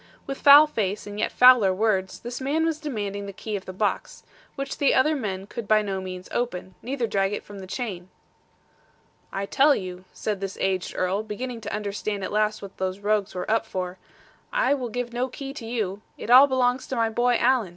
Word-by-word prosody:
With 275 -1 -5
foul 290 +1 +9
face 210 -8 -2
and 205 0 -7
yet - - 0
fouler 250 -6 +7
words, 190 -1 0
this 240 +2 -6
man 300 +5 +1
was 320 -2 -1
demanding 205 -9 -4
the - - -5
key 210 +2 -5
of 195 - -5
the - - -6
box, 205 +3 -2 0.3
which 275 -1 -5
the 280 - +3
other 305 +4 +3
men 195 -8 -4
could 215 +1 -7
by 215 0 +4
no 195 -2 -3
means 185 -1 -7
open, 185 -6 -3
neither 255 0 -2
drag 195 -2 0
it - - -4
from 205 -1 -11
the 190 - -9
chain. 190 -5 -5 1.2
'I 195 +1 -3
tell 280 +7 +4
you,' 185 -1 -6
said 210 -3 -3
this 195 -1 -4
aged 190 -1 -1
Earl, 185 +3 0
beginning 230 +3 -5
to - - -6
understand 205 -1 -3
at - - -4
last 215 0 0
what 195 - -10
these 190 +1 -2
rogues 205 -1 0
were 180 +3 -3
up 225 0 +2
for; 185 -4 -5 0.5
'I - - +2
will 255 -4 -3
give 240 +1 -4
no 245 +2 0
key 270 +1 -7
to 235 -6 -8
you. 210 -4 -2 0.2
It 235 - -4
all 260 +3 +9
belongs 255 -1 +1
to 265 - -3
my 225 -1 +1
boy, 240 +2 +2
Alan. 245 -5 +2
215 Hz, 215 wpm, -25 LUFS, 195-250 Hz, 1.2 s, foul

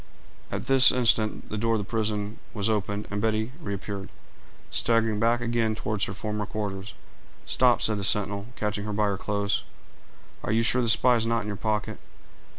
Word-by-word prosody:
At - - -4
this 135 0 +7
instant 115 -3 +1
the 105 - -3
door 115 +1 +1
of - - +1
the 105 - -2
prison 105 0 -2 0.2
was 105 +1 0
opened, 105 0 -2
and 105 0 -2
Betty 110 +1 0
reappeared, 100 - -5 0.6
staggering 115 -2 +2
back 120 +2 +2
again 115 -2 0
toward 105 -1 -2
her - - -5
former 105 -1 -3
quarters. 100 -2 -5 0.5
"Stop," 125 -1 +3
said 105 -2 +1
the - - -4
sentinel, 100 +1 +2
catching 105 -1 -2
her 105 - -3
by 105 +1 +1
her 100 -1 0
clothes; 100 0 -1 0.8
"are - - -2
you 115 +1 +2
sure 125 +3 +3
the 120 - +1
spy 120 +2 +5
is 115 0 -1
not 115 0 +1
in 105 - -7
your 105 - -3
pocket?" 105 +1 -2
110 Hz, 185 wpm, -26 LUFS, 105-115 Hz, 0.8 s, this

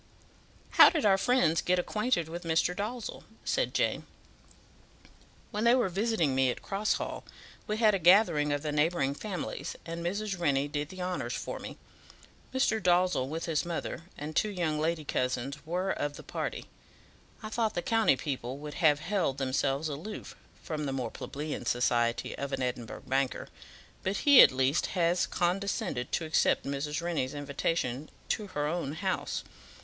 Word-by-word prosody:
"How - - +9
did 315 -8 -1
our 195 -2 +6
friends 190 -10 +3
get 180 0 +2
acquainted 210 -1 0
with 170 +2 -6
Mr. 165 +1 +1
Dalzell?" 220 +4 -4 0.2
said - - +1
Jane. - - 0 1.4
"When 210 -1 -2
they 235 +1 +6
were 245 -7 +2
visiting 195 - +1
me 130 0 +3
at - - -4
Cross 205 +2 0
Hall, - - -4 0.4
we 210 -1 -1
had 220 -2 +5
a 195 - +1
gathering 170 -4 +5
of 145 +1 -1
the 150 - -1
neighbouring 150 -2 +1
families, 190 +4 -5
and 170 0 -5
Mrs. 195 +2 -2
Rennie 140 -4 +2
did 145 0 -3
the 185 -1 -6
honours 180 0 -2
for - - -5
me. - - -8 0.7
Mr. 240 -4 +1
Dalzell, 180 -7 +3
with 160 +2 -3
his 160 -3 0
mother, 170 -1 -4
and 150 +2 -6
two 215 - +2
young 170 -6 -1
lady 160 0 -1
cousins, 130 +2 -2
were 180 +3 0
of 145 0 -2
the - - -10
party. - - -4 0.8
I 215 - -5
thought 220 0 0
the 175 - -1
county 225 -8 +3
people 130 -1 -4
would 150 0 -7
have 150 -3 +4
held 175 -7 0
themselves 135 +2 0
aloof 155 +9 -6 0.3
from 150 -2 -3
the 135 - -2
more 125 -4 -3
plebeian 150 +2 -5
society 120 -1 +1
of 140 0 -3
an 135 -1 -1
Edinburgh 125 -2 -4
banker, 135 0 -1 0.5
but 190 +2 -1
he 285 -3 +10
at - - +8
least 130 +3 +1
has 175 +1 +2
condescended 180 - -1
to 165 - 0
accept 155 - +2
Mrs. 150 +3 -2
Rennie's 155 -6 -1
invitation 145 -1 -2 0.2
to 210 -2 -1
her 150 -6 -2
own 150 -2 -2
house. 185 +3 -2
165 Hz, 165 wpm, -30 LUFS, 140-195 Hz, 1.4 s, he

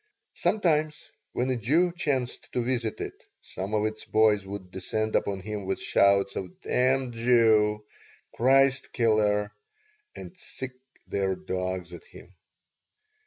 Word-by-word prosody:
Sometimes, 155 -7 0 0.2
when 130 +1 0
a - - +1
Jew 155 - +2
chanced 140 -8 -2
to 125 - 0
visit 120 -3 -1
it - - -6 0.2
some 100 +3 -5
of 105 0 +1
its 110 0 -4
boys 105 -2 +2
would 95 -2 -7
descend 110 +3 -2
upon 100 -1 0
him 105 0 -5
with 95 - -1
shouts 100 0 +3
of 95 -2 -6
"Damned 130 0 +1
Jew!" 110 -3 +3 0.5
"Christ 135 +2 +3
killer!" 105 -3 +2 0.6
and 175 - -9
sick 130 -7 -7 0.3
their 95 -1 -1
dogs 90 -1 -4
at 85 - -10
him. 90 - -15
110 Hz, 130 wpm, -27 LUFS, 100-130 Hz, 0.6 s, shouts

